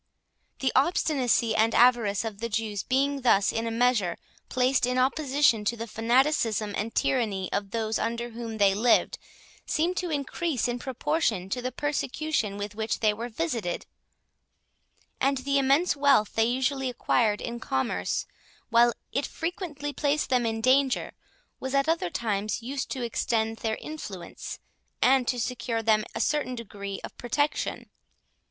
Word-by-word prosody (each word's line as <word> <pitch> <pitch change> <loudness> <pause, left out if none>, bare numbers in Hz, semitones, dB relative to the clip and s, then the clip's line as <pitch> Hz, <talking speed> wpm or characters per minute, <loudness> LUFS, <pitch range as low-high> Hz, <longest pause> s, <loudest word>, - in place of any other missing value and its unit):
The 265 - +2
obstinacy 260 -6 +2
and 225 +1 +3
avarice 230 -4 +4
of 210 -3 -5
the 230 +1 -3
Jews 210 -2 -2
being 275 +3 0
thus 205 -5 +4
in 225 +1 -1
a - - 0
measure 230 -6 +1 0.3
placed 255 0 +2
in 250 0 0
opposition 265 -3 +2
to 235 +3 0
the 230 - -4
fanaticism 225 -1 +1
that 225 +4 -3
tyranny 205 -8 0
of 200 0 -1
those 220 0 -1
under 235 +1 -2
whom 230 -1 -6
they 200 -2 +4
lived, 230 +4 +2 0.5
seemed 335 +4 +1
to 360 - -1
increase 290 -2 -1
in 240 0 -2
proportion 255 - -1
to 250 - -1
the 255 +1 -3
persecution 290 -6 -1
with 205 0 -5
which 220 +1 -2
they 215 -2 +4
were 230 +3 -5
visited; 230 - -2 1.3
and 275 +1 +2
the 275 +2 +1
immense 275 +6 +3
wealth 275 -7 +3
they 225 - +3
usually 260 +2 0
acquired 230 -3 +1
in 235 0 -5
commerce, 130 - -1 0.5
while 235 +1 +5 0.2
it 280 - -1
frequently 320 -4 -4
placed 295 0 0
them 245 -2 +3
in 225 0 -2
danger, 260 +1 +2 0.5
was 265 +1 -3
at 275 +1 +2
other 325 - +1
times 215 +1 -2
used 270 +3 -4
to 260 - -3
extend 225 -1 -1
their 220 -1 -1
influence, 210 - -7 0.4
and 255 -1 +4
to 250 - 0
secure 235 0 -2
to - - -14
them 215 -1 +4
a - - -2
certain 290 -4 0
degree 200 -4 -6
of - - -8
protection. 290 +5 -1
240 Hz, 155 wpm, -27 LUFS, 220-275 Hz, 1.3 s, while